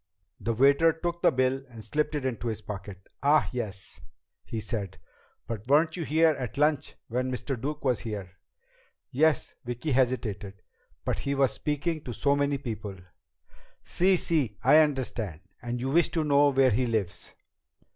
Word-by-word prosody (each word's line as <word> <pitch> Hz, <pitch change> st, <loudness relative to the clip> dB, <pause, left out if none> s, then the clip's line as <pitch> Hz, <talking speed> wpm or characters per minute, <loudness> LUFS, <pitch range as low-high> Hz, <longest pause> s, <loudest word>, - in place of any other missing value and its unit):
The 115 Hz, -1 st, -1 dB
waiter 140 Hz, +6 st, +5 dB
took 170 Hz, +1 st, -4 dB
the 175 Hz, -, +5 dB
bill 130 Hz, 0 st, +1 dB
and 115 Hz, -3 st, -10 dB
slipped 150 Hz, +6 st, -1 dB
it 145 Hz, -3 st, -2 dB
into 120 Hz, -2 st, -2 dB
his 110 Hz, -1 st, -3 dB
pocket. 100 Hz, -2 st, -8 dB, 0.2 s
"Ah, 150 Hz, +2 st, +4 dB
yes," 100 Hz, -10 st, -6 dB, 0.4 s
he 115 Hz, -, -5 dB
said. 100 Hz, -4 st, -4 dB, 0.5 s
"But 110 Hz, 0 st, -6 dB
weren't 155 Hz, +3 st, +4 dB
you 175 Hz, -, -3 dB
here 160 Hz, +2 st, +4 dB
at 125 Hz, -6 st, -5 dB
lunch 150 Hz, -1 st, +1 dB
when 125 Hz, +2 st, -1 dB
Mr. 130 Hz, +2 st, -3 dB
Duke 140 Hz, +5 st, -5 dB
was 125 Hz, -3 st, +2 dB
here?" 100 Hz, -5 st, -6 dB, 0.8 s
"Yes 150 Hz, +1 st, +2 dB
" -, -, -57 dB
Vicki 120 Hz, +5 st, -3 dB
hesitated. 110 Hz, -7 st, -1 dB, 0.4 s
"But -, -, -1 dB
he 140 Hz, 0 st, -2 dB
was 135 Hz, -1 st, +3 dB
speaking 155 Hz, +2 st, -2 dB
to 120 Hz, -, -4 dB
so 140 Hz, +4 st, +2 dB
many 145 Hz, 0 st, +1 dB
people 110 Hz, -6 st, -6 dB, 0.5 s
" -, -, -30 dB
"Sí, 185 Hz, +2 st, +5 dB
sí! 145 Hz, -, 0 dB
I 150 Hz, -, +7 dB
understand. 125 Hz, -, 0 dB, 0.2 s
And 120 Hz, 0 st, -3 dB
you 130 Hz, +2 st, -2 dB
wish 170 Hz, +3 st, +4 dB
to 160 Hz, -, +1 dB
know 145 Hz, -1 st, +4 dB
where 135 Hz, -2 st, +4 dB
he 125 Hz, +4 st, +1 dB
lives?" 105 Hz, -6 st, -3 dB
130 Hz, 170 wpm, -28 LUFS, 110-150 Hz, 0.8 s, I